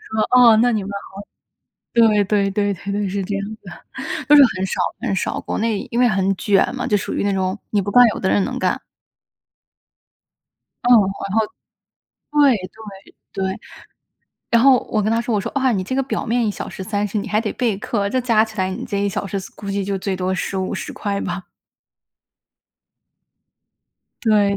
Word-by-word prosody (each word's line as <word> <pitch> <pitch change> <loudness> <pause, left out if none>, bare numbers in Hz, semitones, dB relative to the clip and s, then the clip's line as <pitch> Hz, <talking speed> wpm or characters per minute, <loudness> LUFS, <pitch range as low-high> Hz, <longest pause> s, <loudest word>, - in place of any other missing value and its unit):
我 220 +3 +3
说： 245 -2 +8
“哦， 220 - +6
那 245 +2 +4
你 215 -3 0
们 195 - -7
好” 200 -1 -7 0.8
对， 220 -3 +4
对 200 0 +1
对 205 0 0
对 195 +1 -6
对， 205 0 -1
是 195 +1 -2
这 205 +1 -3
样 200 - -2
子 - - -46
的， - - -13 0.3
都 295 - +7
是 285 - +9
很 185 0 -1
少 - - -2 0.2
很 230 -6 -1
少， 185 - -2
国 - - -4
内 220 -2 -1
因 240 - -1
为 250 - +5
很 195 -2 +1
卷 200 +4 +2
嘛， 250 - -3
就 210 - +1
属 - - -4
于 - - -1
那 200 - +1
种 190 +1 -1
你 205 - +2
不 200 - -4
干， 245 +4 +7
有 - - -6
的 190 - 0
人 200 - +2
能 255 +3 -3
干。 - - 0 2.0
嗯， 245 - +1
然 195 -1 +1
后 220 - +2 0.9
对， 290 -4 +5 0.8
对， 195 - -2
对。 190 - -4 0.9
然 235 0 +4
后， 265 -2 +6
我 215 - +1
跟 215 - 0
他 230 - +2
说 235 -1 -2
我 205 - +1
说： - - -4
“哇， 265 -1 +3
你 185 -3 -1
这 260 - -3
个 270 - +1
表 270 - -3
面 235 0 +1
1 - - +1
小 - - -6
时 - - -7
30 205 +1 -2
你 205 +2 -4
还 210 +1 +1
得 220 -2 -3
备 230 -5 0
课， 200 0 -2
这 255 +5 0
加 230 -3 +3
起 220 -1 -12
来 185 0 0
你 190 - -5
这 200 - -3
1 200 - +1
小 200 - -3
时 195 +1 -3
所 190 - -9
估 200 -1 -6
计 200 -1 -1
就 195 -1 -2
最 190 0 -2
多 185 0 -1
15、 190 0 -3
¥10 200 -1 -4
吧。 180 +1 -4 2.8
对， 205 -3 +3
205 Hz, 210 characters per minute, -20 LUFS, 195-230 Hz, 2.8 s, 是